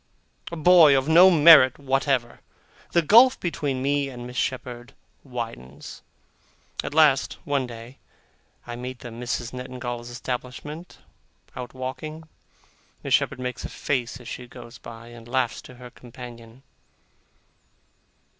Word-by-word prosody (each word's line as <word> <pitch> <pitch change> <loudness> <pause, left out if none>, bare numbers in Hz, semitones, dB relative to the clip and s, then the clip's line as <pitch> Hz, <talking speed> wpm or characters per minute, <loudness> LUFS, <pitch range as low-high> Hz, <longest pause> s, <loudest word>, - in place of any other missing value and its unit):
a - - -4
boy 160 -3 +6
of 135 +1 -1
no 175 +4 +8
merit 155 -6 +7
whatever! 135 -3 -1 0.5
The 170 - +3
gulf 235 - +6
between 145 -6 -3
me 140 0 0
and 120 -2 -9
Miss 125 0 -9
Shepherd 120 -1 -4 0.3
widens. 115 - -8 0.8
At 145 - -6
last, 150 -4 +4
one 140 -3 -1
day, 115 +2 -11 0.7
I 120 - -6
meet 125 +1 -7
the 120 - -8
Misses 120 0 -4
Nettingalls' 125 -1 -6
establishment 125 +7 -6 0.6
out 125 +1 -8
walking. 135 +5 -6 0.8
Miss - - -2
Shepherd - - +2
makes 125 -1 -5
a - - -5
face 125 -3 -3
as 125 - -13
she 125 - -7
goes 120 -1 -12
by, 115 0 -11
and 120 -1 -13
laughs 120 -1 -1
to 125 - -14
her 125 0 -12
companion. 120 0 -12
125 Hz, 130 wpm, -24 LUFS, 120-145 Hz, 0.8 s, no